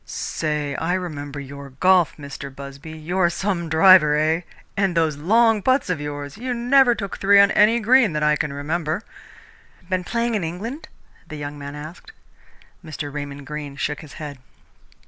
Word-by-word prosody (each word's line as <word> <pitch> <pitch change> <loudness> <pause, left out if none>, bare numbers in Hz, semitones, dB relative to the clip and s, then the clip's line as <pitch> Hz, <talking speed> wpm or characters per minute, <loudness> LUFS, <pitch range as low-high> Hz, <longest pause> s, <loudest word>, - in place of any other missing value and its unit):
"Say, 150 -2 -3
I 175 +3 0
remember 145 -6 -5
your 140 0 -9
golf, 180 +5 +3
Mr. 140 -1 -8
Busby! 140 +2 -10
You're 175 +3 +1
some 175 -2 -2
driver, 160 -2 +6
eh? 160 +2 +1 0.3
And 195 -3 0
those 160 -2 +2
long 220 +8 +3
putts 260 -3 +1
of 165 -5 -2
yours 145 +2 -6
you 250 0 -3
never 245 +1 +4
took 200 -3 -6
three 200 0 +5
on 200 0 +6
any 220 +3 +4
green 235 -3 +4
that 150 0 -1
I 150 0 +4
can 150 -1 -2
remember!" 155 +6 -2 0.9
"Been 185 -1 0
playing 235 +4 -1
in 210 -5 -1
England?" 210 - -5 0.4
the 155 - -8
young 145 0 -6
man 140 0 -7
asked. 160 - -10 0.7
Mr. 150 -3 -6
Raymond 145 -1 -6
Greene 145 -1 -6
shook 150 +1 -3
his 155 -3 -12
head. 145 -3 -8
160 Hz, 165 wpm, -22 LUFS, 145-200 Hz, 0.9 s, driver